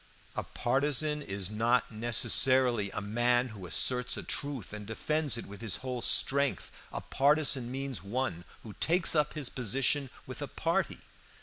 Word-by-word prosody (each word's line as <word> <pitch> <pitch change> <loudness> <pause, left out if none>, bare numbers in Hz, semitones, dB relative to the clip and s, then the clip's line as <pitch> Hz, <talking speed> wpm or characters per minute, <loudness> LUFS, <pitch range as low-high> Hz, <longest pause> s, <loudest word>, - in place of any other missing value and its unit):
"A - - -1
partisan 145 +4 0
is 100 -6 -5
not 115 +3 +1
necessarily 120 0 +3
a 105 - -4
man 120 +4 +1
who 100 -5 -9
asserts 125 - +1
a - - -5
truth 140 -9 -3
and 105 -1 -7
defends 150 +4 -1
it - - -6
with 100 +2 -11
his 110 -6 -3
whole 125 -2 -3
strength. 140 +3 +1 0.2
A - - -5
partisan 140 -3 +2
means 135 -1 -4
one 100 -4 -3 0.2
who 110 - -9
takes 175 +2 +4
up 150 -2 +1
his 145 -5 -2
position 135 +3 0 0.2
with - - -8
a - - -3
party. - - -1
125 Hz, 160 wpm, -30 LUFS, 110-140 Hz, 0.2 s, takes